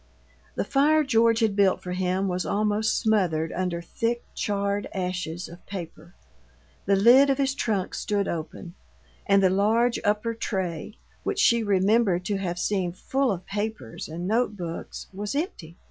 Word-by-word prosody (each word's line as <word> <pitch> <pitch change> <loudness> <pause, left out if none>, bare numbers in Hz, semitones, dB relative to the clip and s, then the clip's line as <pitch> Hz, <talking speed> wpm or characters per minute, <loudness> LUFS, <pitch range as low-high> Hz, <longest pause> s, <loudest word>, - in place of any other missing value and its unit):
The - - 0
fire 305 +3 +3
George 230 -3 +3
had 215 -3 +2
built 200 -2 +3
for 180 - -5
him 185 +1 0
was 180 -1 -1
almost 210 +1 +1
smothered 175 -8 +1
under 175 -1 -2
thick, 235 +6 -2
charred 200 0 -1
ashes 180 -2 -3
of 170 +1 -13
paper. 170 -3 -8 0.7
The 200 - +4
lid 245 +8 +6
of 270 - +2
his 275 -1 +1
trunk 210 -9 -1
stood 205 -1 -1
open, 170 +2 -5 0.5
and 200 0 +4
the 185 - +4
large 225 +5 +2
upper 210 +3 0
tray, 190 -5 -4 0.2
which - - -2
she 235 -1 +4
remembered 200 -2 +2
to 205 0 -1
have 175 -2 -3
seen 180 -2 -1
full 265 +6 0
of 185 -2 -4
papers 210 - -4
and 170 +3 -5
note 220 0 +1
books, 170 -2 -6
was 205 +5 -4
empty. 235 - -4
200 Hz, 160 wpm, -26 LUFS, 180-225 Hz, 0.7 s, lid